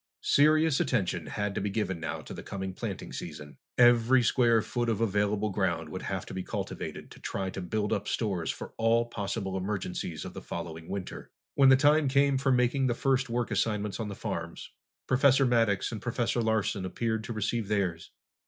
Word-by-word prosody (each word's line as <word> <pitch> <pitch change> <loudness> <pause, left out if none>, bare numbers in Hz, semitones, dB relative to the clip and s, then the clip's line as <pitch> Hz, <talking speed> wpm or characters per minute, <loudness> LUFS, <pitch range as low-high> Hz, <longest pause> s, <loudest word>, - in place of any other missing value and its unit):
Serious 155 0 +4
attention 90 - 0
had 105 +4 -2
to - - -2
be 100 - -1
given 95 -4 -2
now 80 - -4
to - - -9
the - - -7
coming 95 -1 -5
planting - - -5
season. 75 -1 -8 0.2
Every 120 +1 +6
square 115 -2 +3
foot 120 -1 -1
of 110 -3 0
available 105 -1 +1
ground 90 -5 -1
would - - -6
have - - -3
to - - -9
be 95 - -3
cultivated - - -5
to - - -12
try 95 -1 -3
to 95 - -5
build 105 +3 -1
up 100 0 -2
stores 95 -8 -1
for - - -5
all 115 +1 +3
possible 100 -3 -3
emergencies 95 -4 -3
of - - -7
the - - -7
following 80 -1 -6
winter. 100 -2 -6 0.2
When 135 -1 +6
the 130 - +8
time 145 +2 +4
came 140 0 +3
for 135 0 +2
making 125 +2 +2
the 120 - 0
first 135 -1 +1
work 120 0 -1
assignments 105 -2 -1
on 110 - -2
the 100 - -6
farms, 85 -6 -5 0.3
Professor 135 +1 +4
Maddox 115 -5 +2
and 110 -3 -5
Professor 120 +1 0
Larsen 110 -4 0
appeared 110 +4 -2
to 115 - -4
receive 110 0 -1
theirs. 95 -6 -1
110 Hz, 190 wpm, -29 LUFS, 95-120 Hz, 0.3 s, the